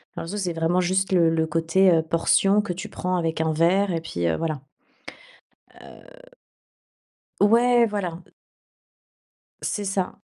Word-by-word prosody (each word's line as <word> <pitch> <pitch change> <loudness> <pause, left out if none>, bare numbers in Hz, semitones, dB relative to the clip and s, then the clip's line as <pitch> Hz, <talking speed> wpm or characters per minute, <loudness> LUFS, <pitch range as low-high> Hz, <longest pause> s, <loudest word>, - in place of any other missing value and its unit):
Dans - - -5
le 165 - -7
sens, 205 +2 -4
c'est 175 -2 -2
vraiment 165 +2 0
juste 190 +2 0
le 170 -3 +4
le 160 0 0
côté, 165 +4 +2
heu, 160 -1 +3
portion 195 +5 +2
que 210 - -5
tu 190 +4 -7
prends 185 -2 -3
avec 165 -1 -2
un 160 0 0
verre 180 +5 +2
et 165 - -1
puis, 85 - -3
heu, 80 - +1
voilà. 155 -4 -3 1.1
Heu. - - -17 1.1
Ouais, 235 +3 +4
voilà. 185 -5 -4 1.4
C'est 205 - -3
ça. 195 0 -3
180 Hz, 150 wpm, -23 LUFS, 165-200 Hz, 1.4 s, le